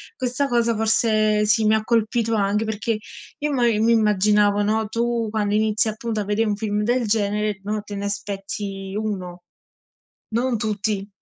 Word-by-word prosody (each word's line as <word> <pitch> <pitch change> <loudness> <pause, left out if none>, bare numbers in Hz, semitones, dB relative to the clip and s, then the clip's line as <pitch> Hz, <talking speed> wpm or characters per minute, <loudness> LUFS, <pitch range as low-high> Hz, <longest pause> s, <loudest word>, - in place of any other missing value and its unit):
questa 255 +3 -1
cosa 235 -2 +2
forse 215 -1 +2
sì, 215 +1 +3
mi 215 +1 +4
ha 220 - 0
colpito 230 0 +1
anche, 210 0 +1
perché 220 +1 -2 0.4
io 295 0 -1
mo 255 -4 +1
io 220 -2 +2
mi 230 - +4
immaginavo, 210 -1 +3
no, 220 +1 0
tu 235 0 -1
quando 210 -1 -1
inizi, 220 0 +2
appunto, 220 0 -3
a - - -2
vede 210 +3 0
un 210 -1 0
film 210 -1 -2
del 240 +2 +1
genere, 210 -1 0
no, 210 +1 -2
te 205 -1 -8
ne 200 0 -4
aspetti 200 -1 -5
1, 185 -5 -4 0.9
non 235 +2 0
tutti. 210 -1 -2
215 Hz, 170 wpm, -22 LUFS, 205-225 Hz, 0.9 s, mi